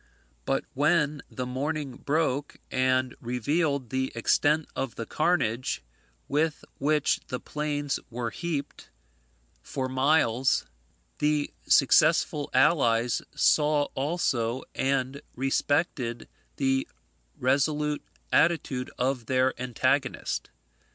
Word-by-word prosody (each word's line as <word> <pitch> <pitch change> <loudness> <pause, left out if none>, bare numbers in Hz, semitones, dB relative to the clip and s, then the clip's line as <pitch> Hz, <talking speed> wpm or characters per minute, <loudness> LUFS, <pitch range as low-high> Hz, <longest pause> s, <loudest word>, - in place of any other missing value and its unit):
But - - 0
when 150 0 +2
the 125 - -4
morning 135 +1 -3
broke, 145 -1 -1
and 130 0 +2
revealed 140 +2 -1
the 130 0 -1
extent 150 +6 +2
of 135 -3 -3
the 115 - -4
carnage, 130 - 0 0.4
with 150 +2 0
which 150 +1 +2
the 125 - -3
plains 145 -1 -2
were 120 -1 -3
heaped 150 -2 -4 0.7
for 130 -1 -3
miles, 130 -2 +2 0.5
the 150 0 +1
successful 150 +1 +4
allies 125 -4 +3
saw 150 -1 +3
also 130 -5 -1
and 135 0 -1
respected 135 -2 0 0.3
the 135 -1 +1 0.5
resolute 150 +3 +1 0.3
attitude 150 -6 +2
of 125 -2 -1
their 130 0 +2
antagonist. 125 -3 0
135 Hz, 95 wpm, -27 LUFS, 130-150 Hz, 0.7 s, successful